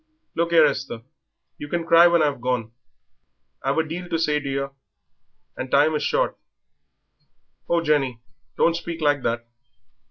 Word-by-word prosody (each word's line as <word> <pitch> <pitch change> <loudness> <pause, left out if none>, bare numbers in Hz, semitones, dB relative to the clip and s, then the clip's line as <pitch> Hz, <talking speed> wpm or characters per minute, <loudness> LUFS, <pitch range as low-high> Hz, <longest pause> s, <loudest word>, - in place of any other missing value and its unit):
"Look 170 +1 -1
'ere, 165 -2 +7
Esther, 135 -5 -3 0.6
you 145 - -6
can 170 +2 -2
cry 170 +1 +7
when 170 -2 +3
I've 145 -4 -1
gone; 125 -3 -2 0.9
I've 135 +2 -1
a 160 -1 +1
deal 175 +3 -6
to 165 - 0
say 150 -2 +1
to 140 -1 -6
yer 140 0 -2 0.8
and 130 - -5
time 145 +4 +4
is 150 - -1
short." - - 0 1.3
"Oh, 170 0 +2
Jenny, 140 -6 +1 0.4
don't 165 - +3
speak 170 -1 -5
like 145 -2 +2
that! 120 -1 -2
150 Hz, 155 wpm, -23 LUFS, 135-170 Hz, 1.3 s, ere